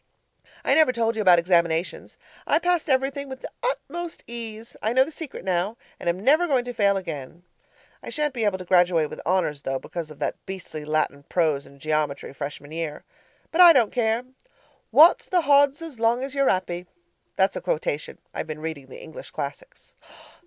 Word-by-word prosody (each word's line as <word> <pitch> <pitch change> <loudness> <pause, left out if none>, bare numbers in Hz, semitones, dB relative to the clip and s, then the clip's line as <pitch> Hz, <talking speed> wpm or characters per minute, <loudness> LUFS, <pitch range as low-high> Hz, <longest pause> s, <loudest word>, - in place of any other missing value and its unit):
I - - +2
never 315 -5 +5
told 230 -2 0
you 220 - -1
about 180 -4 +6
examinations. 170 -1 0 0.3
I - - +4
passed 350 -2 0
everything 270 +1 0
with 265 0 -8
the - - -7
utmost 345 - -4
ease 230 -1 -7
I 220 - 0
know 260 +1 +6
the 300 - -8
secret 310 -7 -8
now, 190 +4 0 0.2
and - - -1
am 170 +2 -1
never 300 - +4
going 260 -5 +1
to 245 - -5
fail 200 -3 +3
again. 165 -2 -7 0.6
I - - -8
shan't 300 -2 -1
be 235 -3 -2
able 205 -3 +1
to 185 - -9
graduate 175 -4 +3
with - - -7
honours 175 -6 +1
though, 135 -1 -2
because 165 +3 -6
of 155 - -12
that - - -3
beastly 185 -5 -7
Latin 150 -2 0
prose 155 -5 +1
and 140 - -17
geometry 150 -2 -2
Freshman 145 +1 -7
year. 160 -2 -4 0.5
But 345 - +4
I 345 -2 +10
don't 235 -7 +3
care. 230 -1 +1 0.7
Wot's 325 +4 +6
the 360 -1 +3
hodds 285 -2 +5
so 330 -1 -7
long 235 +2 +2
as 270 0 -5
you're 275 -1 +2
'appy? 180 -1 -1 0.5
(That's 190 +1 +2
a - - -4
quotation. 150 -1 -2 0.2
I've - - -4
been 155 -1 -5
reading 155 -4 -5
the 130 - -11
English - - -10
classics.) - - -7
200 Hz, 190 wpm, -24 LUFS, 160-275 Hz, 0.7 s, I